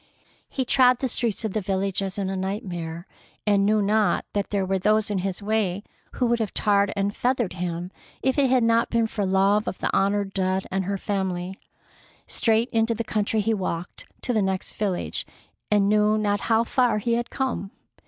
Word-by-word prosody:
He 260 - -2
trod 250 0 +5
the 260 - -1
streets 230 -3 0
of 210 - -2
the 215 - 0
village 195 0 -1
as 195 0 -3
in 195 -2 -1
a 190 - -2
nightmare, 180 -4 -4 0.4
and 200 -1 +3
knew 215 0 +3
not 210 +1 +2
that 205 -1 -1
there 200 -2 0
were 190 0 0
those 215 +2 +2
in 200 - 0
his 190 +1 -3
way 205 -2 0 0.3
who 250 - 0
would 235 0 +2
have 220 -4 -3
tarred 200 -1 +2
and 200 0 -1
feathered 245 -6 0
him 175 0 -4 0.3
if 265 +2 +2
it 270 -2 +4
had 255 -2 +3
not 230 0 +3
been 230 -1 +2
for 210 -3 -2
love 195 +2 +3
of - - -3
the - - -1
honored 200 0 +1
dead 190 0 0
and 190 0 -1
her 200 +1 -1
family. 190 -2 -2 0.7
Straight 225 +1 +1
into 225 0 +1
the 230 - -2
country 215 0 0
he 225 +2 +1
walked, 180 -4 -4 0.2
to 250 - 0
the 215 - +2
next 190 -1 -2
village, 195 -4 -2 0.5
and 205 -1 +3
knew 210 +1 +3
not 205 -1 +1
how 225 0 +4
far 240 -2 +2
he 230 +3 0
had 235 +1 -1
come. 260 -7 -2
205 Hz, 200 wpm, -25 LUFS, 190-225 Hz, 0.7 s, trod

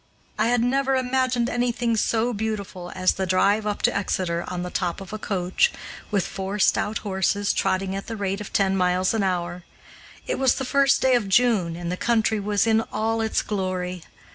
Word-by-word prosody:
I - - +3
had 240 -1 +2
never 270 +2 +1
imagined 255 -1 +1
anything 240 -1 0
so 230 +2 +1
beautiful 200 -4 -4
as 185 0 +2
the 190 -1 -3
drive 200 +4 +2
up 205 - -3
to - - +3
Exeter 180 -3 -1
on 180 -1 -4
the 180 - -5
top 175 -1 -2
of 195 +1 -9
a 215 - -4
coach, 185 -3 +1 0.4
with 200 -3 0
four 195 +1 -4
stout 210 +1 +2
horses, 200 +1 0
trotting 190 0 0
at 195 - -6
the 230 - -4
rate 200 0 -2
of 210 - -8
ten 195 -1 +2
miles 185 +1 +2
an 225 - 0
hour. 180 -2 -2 0.6
It - - -2
was 265 -2 +3
the 265 - -3
first 275 +1 +3
day 260 -1 +4
of 225 -5 +1
June, 195 -6 +3
and 175 0 -4
the 180 - -3
country 220 -1 +1
was 205 +1 +1
in 225 0 +3
all 225 +1 0
its 220 -1 0
glory. 185 -3 -3
205 Hz, 195 wpm, -24 LUFS, 185-230 Hz, 0.6 s, day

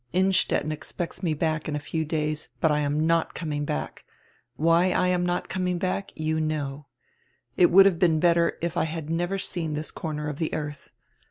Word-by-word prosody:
Innstetten 185 -4 +2
expects 165 +4 -5
me 165 -5 0
back 155 0 -1
in 150 - -2
a - - -1
few 160 +2 -2
days, 155 0 -2
but 160 - +3
I 150 - +2
am 150 +1 0
not 165 0 +1
coming 150 -3 -3
back 75 - -4 0.3
— 120 0 -39
why 165 +3 +3
I 180 0 +2
am 180 -1 +1
not 175 0 -1
coming 180 -1 -1
back, 185 +2 -2
you 155 0 -1
know 145 -2 -3 0.3
— - - -36 0.3
it 175 - +5
would 195 +2 +8
have 185 -4 +3
been 165 -3 +3
better 170 0 +3
if 170 0 -1
I - - +1
had 160 -1 -5
never 175 +4 0
seen 165 -5 -3
this 155 +1 -4
corner 150 -2 -4
of 150 -1 -5
the 160 - -1
earth. 150 -2 -6
160 Hz, 205 wpm, -26 LUFS, 150-175 Hz, 0.3 s, would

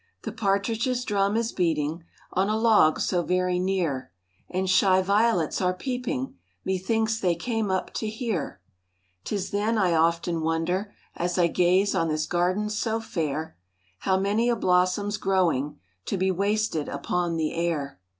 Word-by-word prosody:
The - - -4
partridges' 225 +5 0
drum 200 0 +1
is 230 0 0
beating 160 -2 -1 0.3
On 190 +2 +1
a 215 - +1
log 220 -8 +4
so 180 - +1
very 180 +1 0
near, 180 - -1 0.4
And 185 +1 -1
shy 185 0 +4
violets 200 -4 +2
are 180 0 +1
peeping,— 245 - -3 0.3
Me 190 -1 0
thinks 220 +3 0
they 180 -5 +1
came 225 +3 -2
up 190 0 -1
to 220 - -2
hear. 215 - -3 0.6
'Tis 200 -3 -3
then 210 +3 0
I 185 -4 +2
often 165 +1 +1
wonder 165 +5 -1 0.2
As 175 +1 -2
I 175 - +4
gaze 185 +3 +2
on 165 - +1
this 155 -1 -1
garden 185 +6 0
so 220 +1 -1
fair, 160 - -3 0.4
How 190 -1 +1
many 205 +5 +1
a 240 - +2
blossom's 185 +2 +1
growing 175 -8 +1 0.3
To 200 - -1
be 190 +1 +1
wasted 200 -4 0
upon 175 -1 -1
the 160 -1 -1
air. 160 - -2
185 Hz, 155 wpm, -26 LUFS, 170-210 Hz, 0.6 s, log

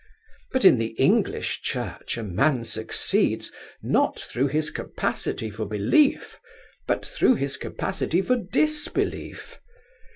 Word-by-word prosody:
But 260 -5 +1
in 130 - +7
the 115 0 -3
English - - +1
Church - - -4
a 115 - -4
man 120 - +1
succeeds, 110 -1 0 0.3
not - - +1
through 130 +4 -1
his 150 +2 -1
capacity 110 -1 -3
for 110 0 -5
belief, 105 - +2 0.5
but - - 0
through - - +3
his 140 -7 -2
capacity 180 +4 -2
for 250 +4 +2
disbelief. 300 +9 -2
140 Hz, 120 wpm, -25 LUFS, -, 0.5 s, in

